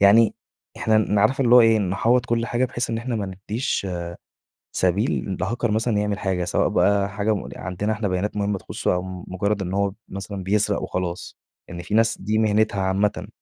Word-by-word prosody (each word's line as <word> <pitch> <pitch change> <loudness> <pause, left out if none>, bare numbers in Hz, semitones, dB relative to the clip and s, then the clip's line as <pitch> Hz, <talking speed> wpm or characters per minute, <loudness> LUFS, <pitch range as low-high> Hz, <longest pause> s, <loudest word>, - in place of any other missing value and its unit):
يعني 105 +3 +6 0.4
إحنا 110 -1 +2
ن 105 - 0
نعرفه 110 +6 +3
اللى 120 +1 +5
هو 125 - +10
إيه 115 -1 +5
نحاوط 115 +6 +1
كل 115 0 0
حاجة 120 +2 +1
بحيث 120 -1 -2
إن 115 - -1
إحنا 120 0 -3
ما 105 -2 -2 0.2
نديش 110 -3 -1
آآ 85 -1 -4 0.7
سبيل 95 +1 0
لهاكر 110 +5 -1
مثلًا 110 0 +1
يعمل 105 -1 -1
حاجة، 95 -2 -1
سواء 90 - +1
بقى 100 -1 +2
حاجة 105 +1 0
م - - -5
عندنا 95 +3 -3
إحنا 110 -1 -2
بيانات 95 +3 -2
مُهمة 100 -1 0
تخصُه، - - -2
أو 90 - 0 0.3
مُجرد 100 +2 -1
إن 95 0 -3
هو 100 -1 0 0.2
مثلًا 95 0 -6
بيسرق 105 +2 +1
وخلاص، 90 -1 -4 0.3
يعني 85 0 -7
في 100 - -6
ناس 115 +1 +3
دي 105 +3 0
مهنتها 110 -2 +2
عامةً. 95 +2 0
105 Hz, 190 wpm, -23 LUFS, 95-110 Hz, 0.7 s, هو